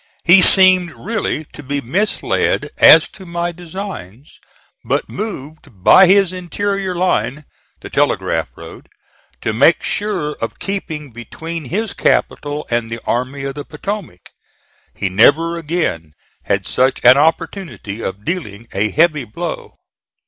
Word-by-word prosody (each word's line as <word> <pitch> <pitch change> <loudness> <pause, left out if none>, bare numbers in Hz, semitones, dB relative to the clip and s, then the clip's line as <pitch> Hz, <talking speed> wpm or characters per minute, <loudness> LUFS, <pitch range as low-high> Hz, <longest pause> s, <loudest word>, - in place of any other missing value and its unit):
He 180 +2 +7
seemed 185 -2 +7
really 210 -7 -3
to - - -10
be 140 +1 -3
misled 185 - -1
as - - +8
to 190 - -14
my 175 -1 -3
designs; 170 - -9 0.4
but - - -1
moved 150 - -8
by 190 - +7
his 195 -1 +4
interior 190 +1 -3
line 155 -5 -1 0.4
the - - -9
Telegraph - - 0
Road - - -12 0.5
to 110 - -2
make 140 +9 +3
sure 205 -8 -2
of 115 - -4
keeping 160 -8 -5
between 160 +7 -7
his 205 - -3
capital 145 +1 -1
and 120 -1 0
the 115 0 -5
Army 130 +3 -2
of 135 0 -4
the 145 +1 -7
Potomac. 160 - -7 0.6
He - - -2
never 145 - +3
again 150 - -3 0.3
had - - -1
such 130 +1 0
an 125 +3 +8
opportunity 155 - -2
of 100 +1 -6
dealing 120 - -5
a 105 +3 0
heavy 155 +1 +2
blow. 165 +10 -7
155 Hz, 135 wpm, -17 LUFS, 125-185 Hz, 0.6 s, as